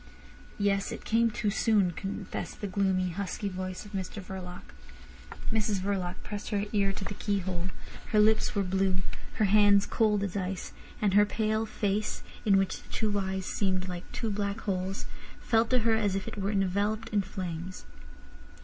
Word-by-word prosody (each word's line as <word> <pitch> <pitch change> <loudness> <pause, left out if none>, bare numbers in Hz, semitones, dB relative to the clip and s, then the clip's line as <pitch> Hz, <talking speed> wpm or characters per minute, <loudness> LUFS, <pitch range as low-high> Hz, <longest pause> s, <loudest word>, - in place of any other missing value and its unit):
"Yes; 200 -1 +1
it - - -7
came 230 +1 +4
too 210 -1 0
soon," 205 -4 +3
confessed 195 +2 -5
the - - -3
gloomy, 190 -1 +1
husky 200 +3 -3
voice 185 +1 -5
of 205 - -11
Mr 195 0 -4
Verloc. 185 -2 -7 0.9
Mrs 215 -3 +1
Verloc 185 -2 -1
pressed 205 0 -5
her 205 -1 0
ear 200 -2 +3
to 195 0 -5
the 205 - -4
keyhole; 190 -3 -1 0.4
her 215 - +3
lips 215 +1 +4
were 200 - +2
blue, 190 0 +1 0.3
her 215 - +2
hands 205 0 +6
cold 210 -3 +2
as 195 -2 -3
ice, 190 -1 -3 0.3
and 200 -2 +3
her 205 +1 +8
pale 220 +1 0
face, 210 0 -1 0.2
in 200 -2 +6
which 195 -1 0
the - - -19
two 210 -2 0
eyes 190 -1 -2
seemed 190 -2 0
like 180 -1 -6
two 225 -2 -2
black 200 +1 -1
holes, 190 -1 -2 0.3
felt 225 -1 +2
to 255 - +4
her 225 - +5
as 210 -3 +2
if 195 - -2
it - - -5
were 200 -1 -1
enveloped 200 +2 +1
in 210 -1 +2
flames. 185 -2 -5
200 Hz, 175 wpm, -30 LUFS, 190-210 Hz, 0.9 s, her